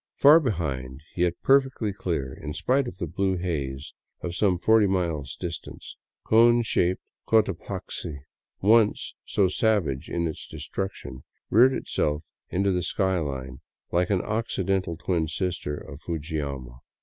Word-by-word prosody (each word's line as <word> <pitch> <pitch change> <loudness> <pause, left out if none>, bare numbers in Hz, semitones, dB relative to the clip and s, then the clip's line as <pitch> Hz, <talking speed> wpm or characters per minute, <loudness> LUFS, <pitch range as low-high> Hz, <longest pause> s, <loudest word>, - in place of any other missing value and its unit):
Far 150 +4 +8
behind, 70 - -3
yet 90 -1 +1
perfectly 135 -6 +3
clear 80 -9 -3
in 75 +2 -7
spite 130 - +1
of 90 - -7
the 90 - -2
blue 95 +3 0
haze 75 -6 -3 0.3
of 85 - -4
some 90 0 +2
forty 110 +3 +4
miles 85 -8 -1
distance, 85 -3 -7 0.3
cone 120 +1 +5
shaped 90 -4 +1 0.2
Cotapaxi, 90 -9 -1 0.4
once 110 +1 +3
so 100 - +2
savage 95 - +1
in 85 0 -1
its 80 - -4
destruction, 75 -9 -5 0.3
reared 125 +5 +6
itself 75 -8 -1 0.3
into 95 +2 +1
the 90 -1 0
sky 95 +1 0
line 65 -4 -5 0.3
like 90 +1 +2
an 95 -3 +1
occidental 95 -5 -1
twin 85 -2 0
sister 85 -2 -2
of 75 +1 -10
Fujiyama. 70 -6 -4
90 Hz, 135 wpm, -26 LUFS, 75-105 Hz, 0.4 s, Far